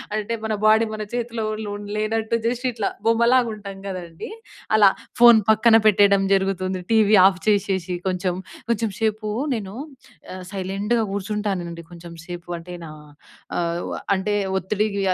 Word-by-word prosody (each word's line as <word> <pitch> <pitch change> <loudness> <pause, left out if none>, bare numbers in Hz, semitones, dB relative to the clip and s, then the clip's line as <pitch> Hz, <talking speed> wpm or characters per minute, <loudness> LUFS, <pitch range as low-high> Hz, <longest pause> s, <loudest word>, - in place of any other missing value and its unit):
అంటే 215 +2 -2
మన 220 - -1
బాడీ 220 +1 +5
మన 215 - -6
చేతిలో 230 -2 -3 0.2
లో 205 - -5 0.3
లేనట్టు 220 +1 -1
జస్ట్ 245 +2 -2
ఇట్లా 220 -3 -2 0.2
బొమ్మలాగా 235 +2 +4
ఉంటాం 200 -2 -9
కదండీ. 170 -3 -7 0.5
అలా 210 -2 +7 0.3
ఫోన్ 240 -1 +9
పక్కన 220 +1 +5
పెట్టేయడం 200 -1 +5
జరుగుతుంది. 190 -1 0
టీవీ 215 -1 +5
ఆఫ్ 190 -1 +3
చేసేసి 195 -3 +1
కొంచెం 185 -1 -1 0.4
కొంచెం 225 -1 0
సేపు 215 -1 -1 0.3
నేను 200 -4 -5 0.6
ఆహ్, 185 0 -8
సైలెంట్‌గా 200 +4 -1
కూర్చుంటానండి. 195 -4 -3
కొంచెం 170 0 -11
సేపు 175 0 -8
అంటే 175 +2 -10
నా 160 - -8 0.7
ఆహ్, 170 0 -2 0.3
అంటే 200 +2 -1 0.2
ఒత్తిడికి 200 +2 -1
205 Hz, 135 wpm, -22 LUFS, 185-220 Hz, 0.7 s, ఫోన్